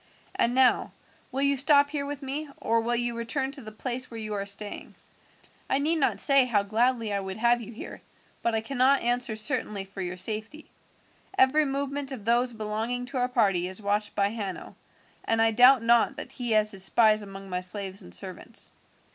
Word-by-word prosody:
And 240 +1 +1
now, 260 -1 +3 0.4
will 270 +2 -1
you 280 0 +3
stop 285 +1 +4
here 285 -2 -3
with 285 -1 -6
me, 285 +3 -4
or 230 +1 +1
will 240 +1 0
you 240 0 -1
return 265 +4 -2
to 280 -1 -6
the 215 -2 -9
place 250 +3 -4
where 230 - -7
you 215 -1 -4
are 200 -1 -3
staying? 205 +1 -3 0.7
I - - +2
need 310 +4 +1
not 285 - +1
say 275 -2 +4
how 215 -5 +1
gladly 230 +1 0
I 200 - 0
would 190 0 -6
have 240 +1 +2
you 230 - -9
here, 220 - -9 0.4
but 230 -1 0
I 220 - 0
cannot 265 +3 +2
answer 240 -1 +1
certainly 215 -1 -1
for 195 0 -9
your 180 0 -4
safety. 220 +10 -3 0.7
Every 295 +2 +4
movement 280 0 -3
of 235 -6 -7
those 240 +2 +2
belonging 225 +3 -3
to 265 +1 -6
our 250 0 +1
party 195 -8 +2
is 185 +2 -4
watched 205 0 -1
by 200 0 +2
Hanno, 205 -4 -6 0.5
and 225 - 0
I 225 0 +4
doubt 250 +2 +6
not 235 +3 +3
that - - -7
he 240 -3 -2
has 215 0 +3
his 195 -1 +2
spies 215 +2 +4
among 195 -1 -9
my 180 - -1
slaves 190 +1 -4
and 90 - -12
servants. 90 - -5
235 Hz, 200 wpm, -27 LUFS, 210-265 Hz, 0.7 s, doubt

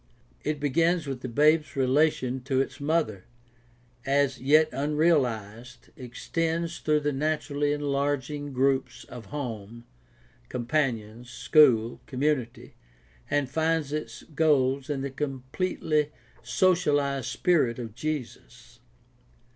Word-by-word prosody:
It 150 -1 -2
begins 165 +4 +1
with 135 -3 -5
the 130 - -5
babe's 150 +5 +3
relation 135 -1 +1
to 130 -1 +1
its 135 +1 -2
mother, 145 - 0 0.8
as 140 0 +1
yet 155 +4 +5
unrealized, 125 -6 -1
extends 165 +6 -3
through 150 -1 +1
the 145 0 0
naturally 145 0 -1
enlarging 145 0 -2
groups 130 -1 0
of 120 -2 -11
home, 115 -5 -6 0.6
companions, 120 -3 -2
school, 120 -3 +3
community, 130 -3 -2 0.6
and 145 -2 +1
finds 160 +1 0
its 155 0 -5
goal 140 -4 +2
in 140 -2 -2
the 140 0 -4
completely 150 +3 -2 0.3
sociahzed 145 -8 +1
spirit 155 -10 +1
of 115 -4 -6
Jesus. 125 - -6
140 Hz, 105 wpm, -27 LUFS, 125-155 Hz, 0.8 s, yet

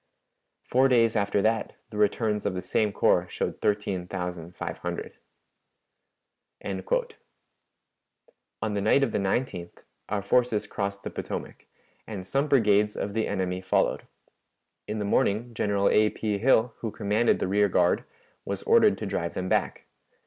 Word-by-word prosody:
Four 130 +2 +3
days 115 -3 +3
after 100 -1 +1
that, 110 0 0 0.2
the 105 - -7
returns 105 0 +1
of 95 - -2
the 90 - -4
same 105 -2 +1
corps - - +2
showed - - -3
thirteen 100 -4 -1
thousand 90 -2 -5
five - - -5
hundred." - - -5 1.5
On 95 -1 -3 1.9
the 100 - -1
night 110 +7 +4
of 125 - 0
the 105 - 0
19th 95 -3 -2 0.3
our 100 -1 -1
forces 120 0 +2
crossed 100 0 -4
the - - -5
Potomac, - - -6 0.4
and 100 -4 -6
some 135 +9 0
brigades 105 -6 +3
of 100 - -3
the 110 0 0
enemy 95 -2 -2
followed. 95 - 0 0.8
In 105 - -3
the 105 - -2
morning 110 +4 +1
General 100 -2 +1
A. 105 0 +4
P. 105 -2 -2
Hill, 120 -1 +3
who 115 - -3
commanded 105 +2 +1
the - - -2
rear 100 +1 +3
guard, 90 -1 +2 0.4
was 100 -1 -4
ordered 225 -3 +5
to 110 - -5
drive 85 -3 -3
them 95 0 -3
back. - - 0
105 Hz, 150 wpm, -27 LUFS, 100-110 Hz, 1.9 s, ordered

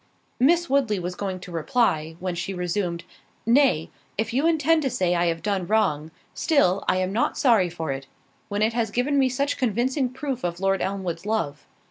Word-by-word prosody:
Miss 340 +7 +4
Woodley 260 -7 +2
was 180 0 -3
going 190 0 -4
to 180 - -9
reply, 160 -2 0
when 185 0 -2
she 175 +3 -4
resumed, 175 -1 -2 0.4
"Nay, 235 - +3 0.3
if 225 +2 -1
you 275 +6 +2
intend 325 0 +3
to 270 - 0
say 180 -6 +1
I 175 0 +2
have 165 -1 -2
done 195 -4 -1
wrong, 165 -8 +1 0.2
still 200 - +2
I - - +3
am 185 +1 -1
not 230 - 0
sorry 225 -9 +4
for 165 -3 -4
it, 135 0 -5 0.4
when 205 +1 0
it 225 +1 +2
has 230 -2 0
given 260 +6 +1
me 265 -1 +3
such 280 +3 -1
convincing 255 +3 0
proofs 260 0 -4
of 175 0 -2
Lord 195 0 +1
Elmwood's 190 -2 -3
love. 180 -10 -2
205 Hz, 190 wpm, -24 LUFS, 175-255 Hz, 0.4 s, Miss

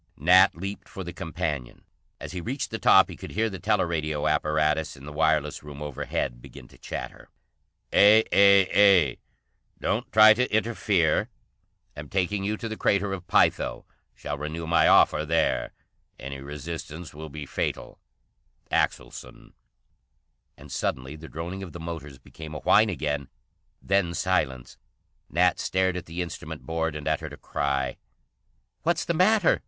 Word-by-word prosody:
Nat 90 +5 +5
leaped 100 +4 -7
for 95 - -7
the 85 0 -7
companion. 80 -7 -4 0.4
As - - -7
he 90 -1 -5
reached 130 - -4
the - - -4
top - - +6
he - - -9
could - - -9
hear 110 +2 0
the 95 - -7
teleradio 85 -7 0
apparatus 75 0 0
in 65 - -12
the 75 - -8
wireless 75 -1 +1
room 75 -1 -10
overhead 70 -4 -4
begin 65 0 -13
to - - -19
chatter: - - -7 0.6
"A 105 +2 +7
A 100 -5 +5
A. - - -15 0.6
Don't - - -2
try 110 0 +8
to 125 +3 -1
interfere. 105 -7 +1 0.7
Am 75 -1 -9
taking 95 +1 -1
you 105 +2 -1
to 115 - -5
the 110 -1 -6
Crater 100 0 +1
of 90 -2 -7
Pytho. - - +1 0.3
Shall 75 -1 -5
renew 80 +2 -5
my 85 0 +3
offer 75 - +5
there. 80 +1 0 0.5
Any 70 +1 -7
resistance 80 +3 -7
will 80 +1 -8
be 75 0 -7
fatal. - - -4 0.7
Axelson." - - -3 1.0
And - - -13
suddenly 65 +3 -3
the 80 +1 -11
droning 85 +4 -6
of 90 -5 -8
the 85 - -8
motors 80 -4 -7
became 75 +4 -11
a - - -4
whine 110 +1 +4
again, 75 -6 -3 0.5
then 95 -3 +1
silence. 75 -10 -1 0.5
Nat 90 +3 +2
stared 95 -1 0
at 90 - -6
the 85 +2 -3
instrument 85 -6 -8
board 80 +2 -2
and 75 -1 -6
uttered - - -2
a - - -9
cry. 70 -2 -2 0.8
"What's 170 0 0
the 170 - 0
matter?" 185 +2 +3
85 Hz, 155 wpm, -26 LUFS, 75-95 Hz, 1.0 s, try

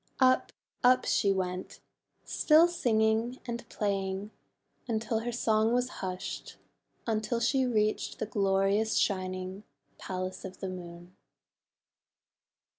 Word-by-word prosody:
Up, 255 -1 +4 0.3
up, 255 0 +5
she 200 - +3
went, 185 -1 -3 0.5
still 315 +2 +5
singing 230 -6 +1
and 235 -1 -5
playing, 195 0 -2 0.6
until 225 -1 0
her 240 +2 -3
song 225 -1 +2
was 250 +1 +1
hushed 185 -1 -5 0.2
— - - -43
until 225 +1 0
she 260 +2 +2
reached 215 -3 0
the - - -2
glorious 200 0 +1
shining 185 0 -1 0.4
Palace 185 0 -4
of 190 -1 -8
the 190 - -4
Moon. 175 -1 -9
215 Hz, 115 wpm, -30 LUFS, 190-235 Hz, 0.6 s, up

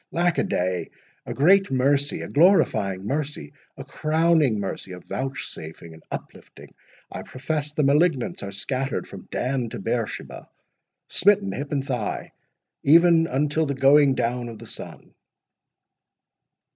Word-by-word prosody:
—Lack 175 0 +1
a - - +2
day! 90 - -1 0.4
a - - -3
great 190 +7 +4
mercy—a 140 +2 +1
glorifying 110 - +3
mercy—a 140 - -5
crowning 155 -6 +2
mercy—a 95 -2 -5
vouchsafing—an 80 -11 -7
uplifting—I - - -11
profess 150 +3 -4
the 150 - 0
malignants 145 -1 +2
are 100 - -6
scattered 130 +7 -3
from - - -11
Dan 125 -2 -2
to 120 - -7
Beersheba—smitten, 190 - -2
hip 140 +2 -5
and 140 -2 -1
thigh, 125 -6 -3 0.5
even 165 +2 +5
until 150 +3 0
the 140 - -2
going 135 +1 +5
down 120 0 -1
of 115 - -9
the - - -11
sun!" - - -9
135 Hz, 115 wpm, -24 LUFS, 120-155 Hz, 0.5 s, even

